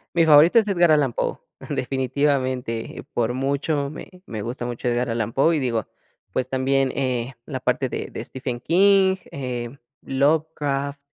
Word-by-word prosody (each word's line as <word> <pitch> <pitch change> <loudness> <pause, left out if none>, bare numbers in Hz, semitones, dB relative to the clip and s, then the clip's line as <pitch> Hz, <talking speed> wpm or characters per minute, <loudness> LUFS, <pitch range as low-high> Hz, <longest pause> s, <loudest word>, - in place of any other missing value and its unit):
Mi 165 -1 +5
favorito 155 +8 +7
es 215 - -1
Edgar 175 -4 +4
Allan 145 -5 +3
Poe, - - -2 0.3
definitivamente, 130 -3 -1
eh, - - -7
por 120 0 +1
mucho 140 +2 -1
me 155 - -10 0.2
me 110 -2 -5
gusta 120 +1 -5
mucho 120 0 -4
Edgar 120 0 0
Allan 115 -1 -2
Poe, 160 +5 +3
y - - 0
digo, 115 -5 -1 0.4
pues, 130 0 -2
también, 135 0 +1
eh, 130 -1 -1
la 130 -4 -4
parte 125 +1 0
de - - -5
de - - -5
Stephen 125 -2 -5
King, 190 +5 +4 0.2
eh, 125 -2 -5 0.3
Lovecraft, 140 -1 0
135 Hz, 160 wpm, -23 LUFS, 125-150 Hz, 0.4 s, favorito